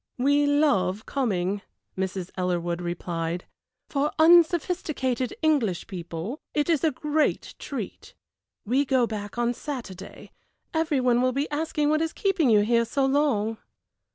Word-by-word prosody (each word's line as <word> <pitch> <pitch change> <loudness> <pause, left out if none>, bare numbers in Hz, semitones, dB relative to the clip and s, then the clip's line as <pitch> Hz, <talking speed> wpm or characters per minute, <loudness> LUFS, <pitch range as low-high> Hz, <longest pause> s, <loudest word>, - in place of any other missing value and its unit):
"We 285 +3 +3
love 220 -9 +2
coming," 200 -7 -1 0.3
Mrs. 190 -1 -3
Ellerwood 175 -1 -1
replied. 175 0 -3 0.4
"For 290 0 0
unsophisticated 315 -6 +3
English 255 - +1
people 175 - -6 0.2
it 300 +3 +2
is 320 -2 +1
a 320 - +4
great 300 +2 -1
treat. - - -7 0.5
We 255 +6 +2
go 260 -3 +2
back 210 -1 -6
on 240 0 +1
Saturday 240 - -8 0.4
every 320 -3 +1
one 245 -1 +3
will 255 0 +2
be 280 +3 -1
asking 300 0 0
what 310 +1 +2
is 325 0 -1
keeping 385 -9 +1
you 210 -2 +5
here 235 +2 +2
so 270 +4 0
long." 265 -6 +1
255 Hz, 135 wpm, -26 LUFS, 195-295 Hz, 0.5 s, you